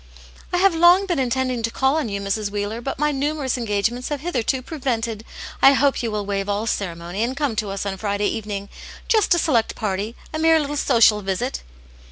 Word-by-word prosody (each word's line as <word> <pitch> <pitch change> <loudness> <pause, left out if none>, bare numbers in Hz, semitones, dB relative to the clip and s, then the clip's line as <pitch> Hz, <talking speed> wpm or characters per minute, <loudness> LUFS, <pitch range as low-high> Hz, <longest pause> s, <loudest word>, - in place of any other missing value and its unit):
" - - -22
I 355 - +1
have 385 0 +4
long 345 +4 +5
been 350 -6 -1
intending 255 -1 0
to 230 - -1
call 265 +4 +1
on 300 -8 -1
you, 200 0 -3
Mrs. 200 +1 -2
Wheeler, 205 +3 -3
but 270 - -4
my 300 +2 +1
numerous 285 -1 -1
engagements 230 +1 -1
have 290 -2 -3
hitherto 265 -5 -1
prevented. 235 -7 -3 0.4
I 270 - +8
hope 275 0 +2
you 235 - -2
will 210 -1 -3
waive 200 0 -2
all 205 +2 -1
ceremony 175 -2 -3
and 250 +4 -1
come 280 -6 -1
to 210 -2 -1
us 195 +1 -4
on 195 -1 -3
Friday 205 0 -1
evening; 205 -2 -3 0.4
just 430 -5 +3
a - - 0
select 250 -9 +1
party; 210 +2 -3 0.2
a 310 - -2
mere 325 0 +5
little 295 -1 -3
social 230 -6 +4
visit." 190 - -2
230 Hz, 210 wpm, -22 LUFS, 205-285 Hz, 0.4 s, I